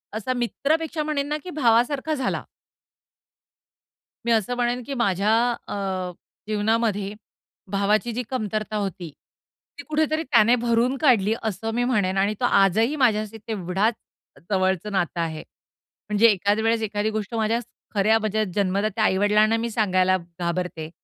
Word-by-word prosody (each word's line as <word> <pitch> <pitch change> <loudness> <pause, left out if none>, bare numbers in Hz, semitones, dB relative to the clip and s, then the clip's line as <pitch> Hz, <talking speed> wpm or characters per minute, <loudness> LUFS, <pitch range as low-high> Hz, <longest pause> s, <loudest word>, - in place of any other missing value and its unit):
असा 225 +4 -2
मित्रापेक्षा 305 +6 -1
म्हणेन 295 -2 -1
ना 300 +1 -1
की 365 - -8
भावासारखा 265 +1 +2
झाला. 265 -3 -2 1.8
मी 235 - +1
असं 225 +2 +1
म्हणेन 245 0 0
की 280 - -3
माझ्या 205 -4 +1 0.4
अ, - - -4 0.7
जीवनामध्ये 215 -1 0 0.6
भावाची 210 +4 +1
जी 245 +2 -2
कमतरता 215 -3 -3
होती, 195 -4 -4 0.7
ती - - -8
कुठेतरी 310 +1 +1
त्याने 235 -4 +4
भरून 240 +2 +1
काढली 225 -7 +4
असं 220 +1 -3
मी 245 - +1
म्हणेन 205 -7 +1
आणि 200 +2 +2
तो 245 - +1
आजही 220 - +3
माझ्याशी 220 -5 +1
तेवढाच 200 +1 0 0.6
जवळचं 190 +1 0
नातं 180 -3 -1
आहे. 160 -1 -4 0.7
म्हणजे 210 +2 +5
एखाद्या 205 +1 +2
वेळेस 225 0 +2
एखादी 210 0 -1
गोष्ट 215 0 -4
माझ्या 225 +1 +1 0.4
खऱ्या 215 +3 +4
म्हणजे 215 0 0
जन्मदात्या 200 +2 0
आई-वडिलांना 210 +3 +3
मी 235 +1 -2
सांगायला 185 -4 +2
घाबरते, 170 -1 -4
215 Hz, 135 wpm, -24 LUFS, 195-240 Hz, 1.8 s, म्हणजे